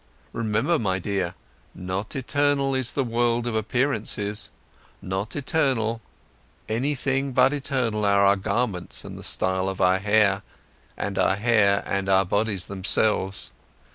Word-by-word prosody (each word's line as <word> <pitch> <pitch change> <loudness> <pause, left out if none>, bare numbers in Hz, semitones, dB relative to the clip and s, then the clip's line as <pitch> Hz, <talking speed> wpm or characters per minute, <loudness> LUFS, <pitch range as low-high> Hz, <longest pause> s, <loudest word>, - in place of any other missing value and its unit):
Remember, 115 +9 0
my 95 -4 0
dear: 95 -2 -2 0.4
Not 95 +3 -4
eternal 140 0 +1
is 130 -2 +1
the 135 - 0
world 120 0 0
of 120 - -2
appearances, 110 -3 -1 0.5
not 95 +4 -4
eternal, 130 -6 0 0.7
anything 135 +3 -1
but 130 +2 +4
eternal 130 -7 -1
are 100 0 +4
our 100 +1 +5
garments 100 -2 -2
and - - -8
the - - -9
style 95 0 0
of 95 - -6
our 90 +1 +3
hair, 105 -1 +3 0.6
and 100 -1 -3
our 95 - +3
hair 105 -2 +3
and 100 -1 -2 0.2
bodies 100 -1 0
themselves. 95 0 0
110 Hz, 130 wpm, -24 LUFS, 100-130 Hz, 0.7 s, our